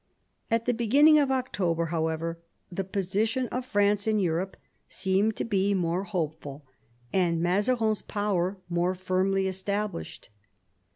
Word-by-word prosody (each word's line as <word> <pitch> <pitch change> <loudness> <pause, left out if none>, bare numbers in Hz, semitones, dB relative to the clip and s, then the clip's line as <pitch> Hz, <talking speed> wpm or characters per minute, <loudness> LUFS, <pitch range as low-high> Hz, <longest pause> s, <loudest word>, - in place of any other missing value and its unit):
At 230 0 +1
the 245 - +2
beginning 280 +7 +5
of 280 -2 +2
October, 195 -11 0
however, 165 +1 -1 0.3
the 195 +2 -2
position 205 +6 -1
of 250 0 -4
France 205 0 +2
in 215 -1 +2
Europe 185 0 -1 0.3
seemed 195 +3 +1
to - - -3
be 200 -2 +1
more 180 +1 0
hopeful, 155 -6 -4 0.5
and 175 -3 +2
Mazarin's 210 +5 +1
power 200 -2 -1
more 175 +1 0
firmly 190 +1 0
established. 195 - -4
195 Hz, 125 wpm, -27 LUFS, 175-215 Hz, 0.5 s, beginning